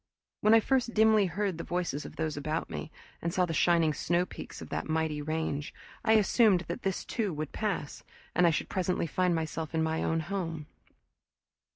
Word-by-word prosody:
When 215 +2 +5
I - - +8
first 245 0 0
dimly 215 -2 +5
heard 185 0 -2
the - - -3
voices 175 -5 -2
of - - -12
those 155 -1 -2
about 155 +2 -3
me, 75 -1 -5 0.3
and 170 - -1
saw 180 +1 +2
the 165 - -3
shining 165 -1 +3
snowpeaks 175 +4 -2
of - - -9
that - - -3
mighty 155 -1 0
range, 155 -1 -3 0.3
I 220 -1 +4
assumed 215 -3 +4
that - - -5
this 195 -2 -2
too 215 -5 -1
would 150 -1 -4
pass, 200 -9 -3 0.3
and 180 - +4
I - - +6
should 160 - -1
presently 180 -2 0
find 180 +2 +1
myself 160 0 -3
in 160 - +2
my 160 0 0
own 165 0 +1
home. 165 -3 -4
170 Hz, 190 wpm, -30 LUFS, 160-195 Hz, 0.3 s, I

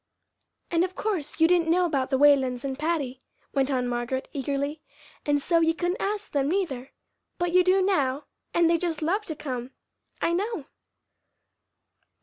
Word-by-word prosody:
"And 335 0 +3
of 370 0 -3
course 355 -9 -2
you 325 - +6
didn't 340 -2 +3
know 360 +2 +4
about 275 -6 0
the 265 - +2
Whalens 265 -3 +4
and 270 0 -3
Patty," 290 -5 -1 0.3
went 275 -1 +1
on 255 -3 0
Margaret, 245 +2 -2
eagerly, 280 +2 -2 0.5
"and 290 0 +3
so 335 +4 +2
you 325 0 +2
couldn't 355 +2 -1
ask 415 +1 -2
them, 280 -1 +1
neither. 290 -9 -1 0.5
But 350 0 0
you 365 0 +6
do 375 +1 +4
now, 290 -7 +1 0.3
and 340 -1 +3
they'd 335 -1 +2
just 330 -3 -1
love 395 +7 0
to 315 - -4
come, 255 -4 -5 0.5
I 335 - +1
know!" 390 - -2
310 Hz, 165 wpm, -26 LUFS, 270-350 Hz, 0.5 s, you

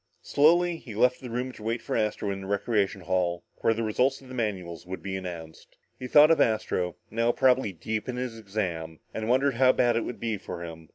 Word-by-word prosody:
Slowly, 170 +4 +4
he 115 -9 -10
left 125 +3 +3
the 125 - -7
room 125 +2 -3
to 125 - -14
wait 115 +2 -1
for - - -4
Astro 105 -2 0
in 95 0 -4
the 95 - -7
recreation 100 -1 0
hall 85 -1 0
where 115 - +2
the 115 - -2
results 125 +5 +1
of 130 - -15
the - - -8
manuals 95 -8 -3
would 95 +1 -7
be 95 -1 -3
announced. 85 -4 -8 0.2
He 125 - -5
thought 150 +4 +7
of 165 - +4
Astro, 90 -5 0 0.2
now 115 +1 +2
probably 130 -4 +3
deep 110 +7 -4
in 125 - -2
his 125 -2 -4
exam, 95 -7 -4 0.2
and 110 +1 -3
wondered 135 +2 +3
how 130 0 +6
bad 120 -2 +2
it 115 - +2
would 120 - -5
be 115 -2 -2
for 90 -2 -7
him. 80 -1 -9
110 Hz, 225 wpm, -27 LUFS, 95-125 Hz, 0.2 s, thought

